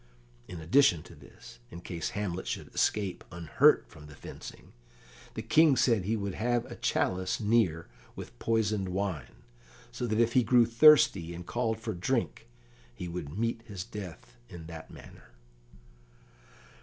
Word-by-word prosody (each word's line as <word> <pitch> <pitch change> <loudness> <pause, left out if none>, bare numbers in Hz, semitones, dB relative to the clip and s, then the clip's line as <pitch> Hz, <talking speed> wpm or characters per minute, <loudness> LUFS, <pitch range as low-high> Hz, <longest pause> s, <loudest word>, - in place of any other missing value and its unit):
In 90 - -8
addition 85 - +3
to - - -14
this, - - -15
in 85 - -9
case 85 -2 -4
Hamlet 95 -3 -3
should - - -5
escape 100 -4 0
unhurt 85 -2 +3
from 75 -1 -14
the 75 - -13
fencing, - - -11 0.6
the 110 - -4
King 150 +6 +5
said 115 -7 +2
he 110 +3 0
would 100 -2 -3
have 120 +4 0
a - - -9
chalice 95 0 -1
near 105 -7 +1 0.3
with - - -10
poisoned 105 -4 0
wine, 95 -6 -4 0.5
so 120 - -4
that 110 0 0
if 115 0 +2
he 130 - +5
grew 120 +1 +4
thirsty, 115 - +5
and 90 +1 -8
called 115 0 -2
for 110 -1 -4
drink, 85 -7 -2 0.5
he 90 - -6
would 85 -1 -6
meet 115 0 -1
his 100 -4 -6
death 95 - -10
in 85 -2 -10
that 80 -1 -10
manner. - - -14
100 Hz, 155 wpm, -29 LUFS, 85-115 Hz, 0.6 s, King